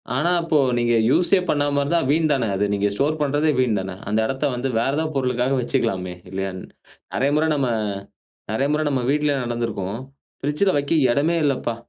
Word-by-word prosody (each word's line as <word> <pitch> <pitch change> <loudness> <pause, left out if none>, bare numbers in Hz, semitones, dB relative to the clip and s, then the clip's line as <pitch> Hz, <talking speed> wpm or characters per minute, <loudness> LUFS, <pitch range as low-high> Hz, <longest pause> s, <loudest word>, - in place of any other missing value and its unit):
ஆனா, 150 +7 +1
அப்போ 165 -2 +1 0.2
நீங்க 120 0 +2 0.2
யூஸ்ஸே 180 +6 +4
பண்ணாம 145 -1 +1
இருந்தா, 165 +4 +1
வீண் 155 +1 +2
தான 130 -4 0
அது, 100 - +1
நீங்க 100 0 +1
ஸ்டோர் 150 +8 0
பண்றதே 145 +2 +1
வீண் 115 -5 +2
தான! 95 -1 -5
அந்த 110 +1 +1
எடத்த 135 +4 -2
வந்து 130 +2 -2
வேற 135 +4 +1
எதோ 160 - +1
பொருளுக்காக 125 0 0
வச்சுக்கலாமே! 90 -6 -1 0.2
இல்லயா? 95 +1 -3 0.6
நெறைய 140 +2 +1
முறை 155 +1 +2
நம்ம, 135 -3 0 0.8
நெறைய 135 +6 0
முறை 155 - +1
நம்ம 135 -3 0
வீட்லயே 150 -1 +1
நடந்திருக்கும். 115 -3 -3 0.4
பிரிட்ஜ்ல 150 +8 +1
வைக்க 145 +2 -1 0.2
எடமே 150 +7 +1
இல்லப்பா. 130 -5 0
135 Hz, 170 wpm, -22 LUFS, 115-150 Hz, 0.8 s, யூஸ்ஸே